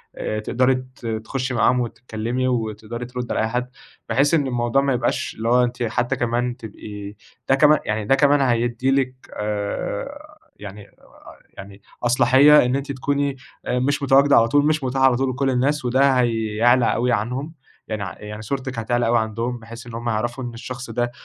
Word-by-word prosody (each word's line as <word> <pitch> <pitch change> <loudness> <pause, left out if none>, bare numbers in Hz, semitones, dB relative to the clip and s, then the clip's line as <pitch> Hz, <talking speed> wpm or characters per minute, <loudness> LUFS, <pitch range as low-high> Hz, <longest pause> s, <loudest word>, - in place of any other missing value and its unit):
آآ 110 - -3
تقدري 125 +4 +1 0.2
ت 120 - -14
تخُشِّي 120 +4 -3
معاهم 125 +1 +3
وتتكلمي، 120 +1 -3
وتقدري 115 -1 -3
تردّي 125 0 -5
على - - 0
أي - - +1
حَد، 125 +2 -2 0.4
بحيث 135 +7 +2
إن 145 -4 +2
الموضوع 120 +1 +1
ما 140 -1 +1
يبقاش 125 - -1
اللي 115 +1 -2
هو 125 +1 +4
أنتِ 125 0 -2
حَتّى 120 +1 -1
كمان 120 +1 -1
تبقي 110 -2 -10 0.6
ده 135 - +5
كمان 150 +2 +5
يعني 105 0 -2
ده 135 - +4
كمان 145 0 +4
هيدِّي 120 0 +1
لِك 135 -2 +1 0.3
آآ، 275 - -4 0.2
يعني 105 0 -10
آآ، - - -28 0.6
يعني 100 +1 -11 0.2
أصلاحية 130 +5 +6
إن 125 +2 0
أنتِ 140 0 -4
تكوني 140 +1 -1 0.3
مش 130 +4 0
متواجدة 140 +1 +5
على 115 0 +5
طول 145 +4 +3
مش 155 -2 +1
مُتاحة 130 +1 0
على 130 -2 +3
طول 135 +1 0
لكل 135 +1 0
الناس، 135 +4 0
وده 135 +3 +3
هيعلى 115 +1 +2
أوي 125 +1 +1
عنهم، 125 +8 -2 0.3
يعني 110 -2 -3
ع 95 - -4
يعني 105 0 -8
صورتِك 130 +2 -4
هتعلى 120 +1 0
أوي 120 +1 +3
عندهم، 115 +2 -2
بحيث 115 +1 -11
إن 120 - -9
هُم 120 +1 -4
يعرفوا 120 +3 -2
إن 120 -1 -6
الشخص 125 +1 -7
ده 120 +1 -1
125 Hz, 185 wpm, -22 LUFS, 115-135 Hz, 0.6 s, أصلاحية